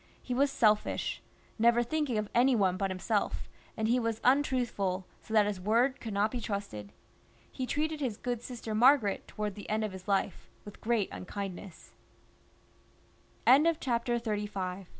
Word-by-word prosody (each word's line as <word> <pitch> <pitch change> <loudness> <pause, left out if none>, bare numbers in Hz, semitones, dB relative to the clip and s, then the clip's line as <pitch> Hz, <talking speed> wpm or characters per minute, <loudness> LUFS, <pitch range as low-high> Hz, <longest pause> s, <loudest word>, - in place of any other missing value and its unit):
He 250 - -5
was 275 +3 +3
selfish, 215 -5 +1 0.4
never 235 +1 +4
thinking 285 -2 -1
of 215 -1 -1
any 250 +2 +4
one 190 -4 +2
but 195 +1 -1
him 185 - -4
self, 210 +2 -1 0.3
and 220 -1 0
he 245 +3 +3
was 230 -2 -1
untruthful, 245 -9 +1 0.2
so - - -14
that 215 -2 +5
his 205 -3 -3
word 240 +7 +2
could 225 - -6
not 205 +2 +1
be 245 - -3
trusted. 200 - -5 0.6
He 255 - -4
treated 310 +2 -1
his 250 -7 -2
good 245 -2 -3
sister 235 -3 -6
Margaret, 235 -2 +4
towards 210 -2 -4
the 205 - -9
end 215 +1 0
of 215 - -2
his 190 0 -10
life, 200 -1 -1 0.2
with 205 - -11
great 225 -3 +1
unkindness. 190 -1 -7
220 Hz, 150 wpm, -30 LUFS, 200-245 Hz, 0.6 s, that